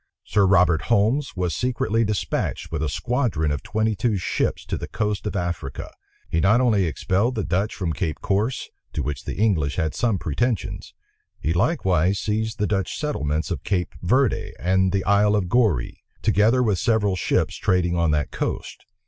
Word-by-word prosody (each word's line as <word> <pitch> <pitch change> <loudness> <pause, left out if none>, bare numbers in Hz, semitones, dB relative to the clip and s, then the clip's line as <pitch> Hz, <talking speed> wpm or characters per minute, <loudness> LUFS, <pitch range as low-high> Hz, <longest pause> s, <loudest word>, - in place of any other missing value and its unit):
Sir 100 -2 +2
Robert 90 -3 +4
Holmes 120 +6 +2
was 90 -2 -1
secretly 125 -2 0
despatched 100 -5 -2
with 80 -2 -2
a 80 - 0
squadron 115 - 0
of 75 - -2
twenty 110 0 0
two 110 0 0
ships 90 - -1
to - - -3
the - - -5
coast 105 -2 -2
of 105 - -4
Africa. 85 -7 -4 0.4
He 80 - 0
not 105 +7 +4
only 110 -7 +3
expelled 100 - 0
the 110 - -1
Dutch 95 +5 -1
from 85 -4 -2
Cape 80 -3 -3
Corse, 105 +6 -1 0.2
to - - -2
which 75 -3 -4
the - - -4
English 90 -10 +1
had 80 -4 -1
some 115 -4 +1
pretensions; 110 - -2 0.4
he 80 - 0
likewise 95 - +2
seized 110 +2 -2
the 105 - +1
Dutch 100 -2 -1
settlements 80 - -2
of 85 - -3
Cape 90 -3 -1
Verde 115 +1 +1
and 95 +1 +2
the 95 0 0
Isle 105 +1 +3
of 100 -4 0
Goree, 105 - +1 0.2
together 115 +6 +3
with 105 -6 +1
several 110 -5 +2
ships 90 - 0
trading 90 -2 +1
on 85 -1 +2
that 75 -1 0
coast. - - -4
100 Hz, 175 wpm, -23 LUFS, 85-110 Hz, 0.4 s, Robert